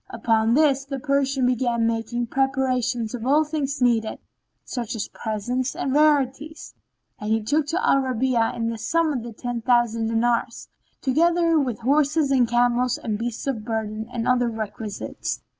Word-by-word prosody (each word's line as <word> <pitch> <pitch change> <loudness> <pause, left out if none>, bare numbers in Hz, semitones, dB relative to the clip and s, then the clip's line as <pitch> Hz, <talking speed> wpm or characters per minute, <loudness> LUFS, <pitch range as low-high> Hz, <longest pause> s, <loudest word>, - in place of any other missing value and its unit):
Upon 225 0 +1
this 280 -3 +3
the 275 0 -5
Persian 275 -1 +1
began 240 -2 +1
making 230 +1 -1
preparation 255 -2 0
of 240 -2 -5
all 290 +5 +4
things 295 -3 -2
needed, 230 -3 +1 0.5
such 240 -3 -4
as 215 - -3
presents 240 +4 -3
and 265 - -2
rarities; 295 0 +1 0.5
and 210 - -4
he 220 0 +1
took 295 +6 0
of 350 - 0
Al - - +4
Rabi'a 255 -2 0
in 230 - -3
all 230 - 0
the 230 - -5
sum 330 +4 +1
of 235 -4 -6
ten 245 -1 -4
thousand 235 -2 +2
dinars, 235 +1 -1 0.3
together 335 +4 +3
with 250 -5 -2
horses 285 +3 +2
and 255 -3 +4
camels 245 +1 +2
and 215 -2 -3
beasts 235 0 -4
of 255 -6 -2
burden 220 -1 -4
and 235 -1 -3
other 245 -1 +2
requisites. 215 -1 -5
245 Hz, 160 wpm, -23 LUFS, 230-275 Hz, 0.5 s, all